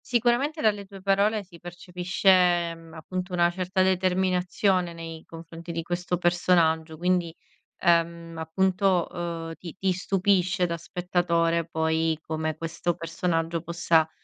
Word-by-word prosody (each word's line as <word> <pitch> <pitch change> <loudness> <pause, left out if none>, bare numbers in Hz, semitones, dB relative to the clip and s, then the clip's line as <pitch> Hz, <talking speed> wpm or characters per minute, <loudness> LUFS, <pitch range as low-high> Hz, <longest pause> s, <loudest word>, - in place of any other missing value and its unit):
Sicuramente, 250 +6 +1
dalle 205 -2 +1
tue 195 0 -12
parole 200 +2 +2
si 180 -3 -16
percepisce, 180 0 +2
mhmm, 165 -1 -15
appunto, 180 +3 -5
una 175 -1 +3
certa 185 +1 0
determinazione 185 0 +1
nei 165 -1 -8
confronti 165 +1 -9
di 165 0 -3
questo 175 +1 -2
personaggio. 170 -2 +2
Quindi, 175 0 +1 0.5
ehm, 170 -1 +1
appunto, 185 +2 +1
uhm, 170 -1 -4
ti 170 -3 -9
ti 190 0 +1
stupisce, 185 0 +1
da 170 -1 -2
spettatore, 170 -1 0
poi, 160 0 0
come 155 0 -2
questo 165 +1 -2
personaggio 165 0 -2
possa, 170 -1 +2
175 Hz, 125 wpm, -26 LUFS, 165-185 Hz, 0.5 s, una